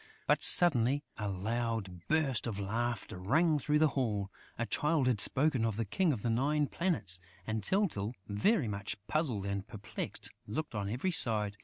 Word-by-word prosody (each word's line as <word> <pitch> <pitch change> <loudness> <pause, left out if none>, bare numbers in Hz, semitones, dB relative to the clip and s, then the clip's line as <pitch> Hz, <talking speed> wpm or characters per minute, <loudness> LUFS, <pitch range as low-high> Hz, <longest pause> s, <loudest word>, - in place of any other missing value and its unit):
But, - - +2
suddenly, 145 -4 +6 0.2
a 105 -1 -2
loud 105 -2 -3
burst 145 -7 +1
of 110 -4 -4
laughter 110 -1 -3
rang 155 - +2
through 150 +2 +1
the 155 0 +4
hall. 105 -8 -2 0.3
A 120 - -1
Child 150 +2 +1
had 120 -5 +3
spoken 135 -3 +3
of 110 -2 0
the 115 - -1
King 170 - +1
of 120 -7 -4
the 120 - 0
Nine 145 +6 +1
Planets; 140 - -2 0.3
and 110 0 -2
Tyltyl, 125 - 0
very 120 - +1
much 100 -1 -4
puzzled 130 - -1
and 100 0 -3
perplexed, 110 -4 -6 0.2
looked 150 +8 -4
on 100 -2 -3
every 130 - -1
side. 105 - +1
120 Hz, 170 wpm, -32 LUFS, 105-150 Hz, 0.3 s, suddenly